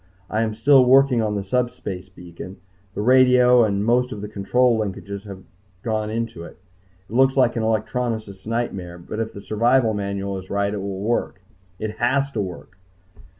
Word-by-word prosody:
I 110 - +1
am 110 -1 -1
still 130 +4 +5
working 130 -1 +5
on 105 -1 -1
the 100 - -2
subspace 100 -4 -3
beacon. 90 +1 -11 0.4
The 105 - -2
radio 125 0 +5
and 100 -1 0
most 125 +2 +2
of 105 - -6
the 105 - -5
control 115 +4 +1
linkages 100 0 -5
have 95 -1 -9 0.4
gone 110 -2 -1
into 115 -5 -4
it. - - -12 0.5
It - - -12
looks 135 +2 +3
like 125 -3 +3
an 115 - -1
electronicist's 110 -2 -2
nightmare, 95 -7 -3
but 90 +5 -7
if 115 0 -2
the 100 - -10
survival 115 +2 +2
manual 100 -1 -3
is 95 - -13
right, 100 0 0
it 105 - -3
will 95 -1 -5
work. 105 -3 -2 0.3
It 110 +1 -5
has 135 +3 +1
to 110 - -2
work! 90 0 -8
110 Hz, 180 wpm, -22 LUFS, 100-125 Hz, 0.5 s, still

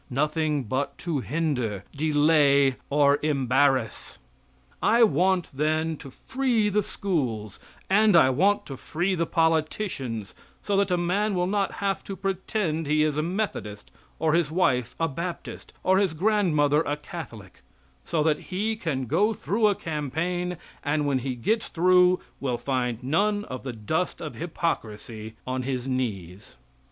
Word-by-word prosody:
Nothing 150 +1 0
but 130 +5 -2
to 165 -5 0
hinder, 125 - -2
delay 145 -3 +4
or 145 0 +4
embarrass. 135 -4 +1 0.6
I 235 +1 +5
want, 185 0 +2
then, 155 +2 0
to 135 - -10
free 245 - 0
the 210 +1 +2
schools; 130 - -3 0.3
and 210 0 +4
I 130 -6 +6
want 195 +10 +2
to 135 - -7
free 175 +8 -1
the 170 -2 0
politicians, 155 - -1 0.3
so 205 - 0
that 200 -1 +2
a 180 - +2
man 195 +4 0
will 180 0 +1
not 195 +1 0
have 195 -1 0
to 195 - -5
pretend 190 -4 -2
he 155 +1 +3
is 155 -2 +1
a 150 - +1
Methodist, 165 - -4 0.3
or 155 -1 +1
his 165 -3 +2
wife 130 -8 +1
a 165 - +2
Baptist, 170 +4 -6
or 190 +1 +4
his 190 -5 +1
grandmother 155 -6 +2
a 145 -2 -2
Catholic; 120 - -9 0.4
so 155 - 0
that 155 -1 +2
he 210 +4 -1
can 155 - -2
go 205 - +2
through 215 +2 +1
a 205 - +2
campaign, 170 +3 -3 0.3
and 150 0 0
when 140 -2 +1
he 130 0 -3
gets 215 - 0
through 180 +1 +4 0.2
will 130 -3 -1
find 125 -2 -2
none 205 +9 +1
of 130 -1 -6
the 130 -2 -5
dust 140 - -2
of 155 -3 -6
hypocrisy 110 -9 -4
on 130 0 -2
his 130 -1 -3
knees. 105 -8 -4
155 Hz, 150 wpm, -26 LUFS, 130-185 Hz, 0.6 s, I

